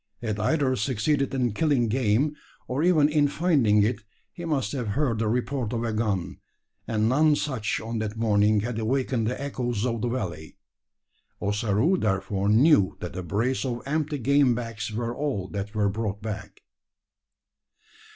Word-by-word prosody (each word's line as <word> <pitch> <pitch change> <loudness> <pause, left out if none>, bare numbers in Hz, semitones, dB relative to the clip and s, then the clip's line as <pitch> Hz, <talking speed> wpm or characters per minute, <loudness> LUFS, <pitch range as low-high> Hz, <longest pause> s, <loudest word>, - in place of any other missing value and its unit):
Had 110 -2 -2
either 130 +3 +1
succeeded 135 +5 0
in 125 -4 0
killing 140 -3 +2
game, 125 +5 +1 0.3
or 130 +3 -1
even 160 -4 +4
in 150 -1 +3
finding 140 - +3
it, 115 +2 0 0.3
he 170 - -7
must 140 -9 -1
have 125 -5 -3
heard 130 -7 +1
the 110 - 0
report 125 +1 -1
of 115 0 -1
a 115 -2 -1
gun, 100 -5 -2 0.5
and 110 -1 +1
none 150 +5 +4
such 130 -7 -2
on 115 +1 -4
that 110 0 -4
morning 105 -1 +3
had 115 +1 -3
awakened 125 0 0
the 125 - -2
echoes 120 -5 -2
of 115 -3 -1
the 120 - 0
valley. 85 - -5 0.8
Ossaroo, 105 - +1
therefore, 95 - 0
knew 110 - +4
that 90 - -6
a 95 - -3
brace 110 +9 -1
of 120 -3 -3
empty 150 +1 -1
game 140 -1 +3
bags 115 -2 -5
were 115 +2 -3
all 135 -11 -2
that 100 +1 -5
were 105 -1 +2
brought 100 0 -2
back. 110 -1 -7
115 Hz, 160 wpm, -26 LUFS, 105-140 Hz, 0.8 s, even